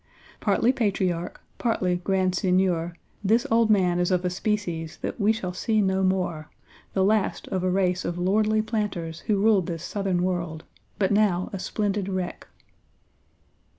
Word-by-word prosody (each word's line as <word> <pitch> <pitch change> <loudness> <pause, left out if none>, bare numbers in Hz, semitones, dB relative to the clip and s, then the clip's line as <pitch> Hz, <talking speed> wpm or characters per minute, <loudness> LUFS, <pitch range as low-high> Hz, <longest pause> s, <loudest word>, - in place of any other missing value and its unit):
Partly 215 +4 +3
patriarch, 190 -8 -1 0.2
partly 185 -7 +1
grand 185 0 0
seigneur, 180 -2 +1 0.3
this 225 +6 +3
old 225 -1 +4
man 180 -4 +3
is 175 - +1
of 180 -1 +1
a 180 - 0
species 180 -5 -2
that - - -3
we 205 +2 +4
shall 190 -5 -3
see 215 +4 0
no 190 -1 +2
more; 180 -5 0 0.4
the 190 - +2
last 210 +1 +1
of 185 -1 -1
a 185 - +2
race 180 -1 +1
of 175 - -3
lordly 215 +4 +2
planters 200 -7 -3
who 210 - +2
ruled 205 -4 +3
this 165 -1 -4
Southern 190 -3 -1
world, 170 -3 -2 0.3
but 195 -1 +1
now 200 -1 +2
a 195 - -3
splendid 200 0 -1
wreck." 185 -2 -4
190 Hz, 155 wpm, -25 LUFS, 180-210 Hz, 0.4 s, old